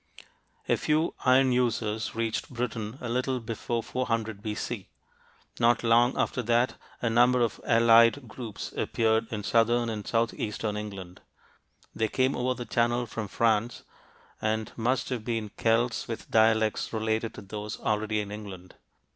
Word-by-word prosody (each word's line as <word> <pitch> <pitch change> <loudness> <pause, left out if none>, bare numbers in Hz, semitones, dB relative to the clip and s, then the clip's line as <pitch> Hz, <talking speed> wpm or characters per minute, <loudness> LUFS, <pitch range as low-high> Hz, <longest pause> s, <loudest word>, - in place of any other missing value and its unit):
A - - +3
few 155 +2 +1
iron 130 +1 +5
users 115 -3 0
reached 115 -1 -2
Britain 115 -2 -4
a 120 - -4
little 125 +2 -1
before 115 0 -3
400 115 -4 -2
B.C. 105 -1 -4 0.7
Not 120 +1 +3
long 120 +2 +4
after 125 - 0
that, 120 +2 +2 0.3
a 115 - +2
number 125 +2 +4
of 115 -3 0
allied 115 +2 +5
groups 115 -2 -7
appeared 110 0 +1
in 105 -2 -3
southern 115 +2 +2
and 105 -3 -5
southeastern 110 -2 -1
England. 95 -4 -7 0.7
They 110 - 0
came 130 +4 +1
over 125 +1 0
the 120 - -6
Channel 120 +1 +1
from 110 -2 -5
France 115 +2 0 0.6
and 110 0 -1
must 120 +2 0
have 125 -4 -3
been 115 -2 -2
Celts 115 +3 0
with 115 - -6
dialects 110 -1 +3
related 110 0 -1
to - - -9
those 105 +2 -6
already 110 0 0
in 100 -1 -7
England. 95 -4 -9
115 Hz, 145 wpm, -28 LUFS, 110-120 Hz, 0.7 s, iron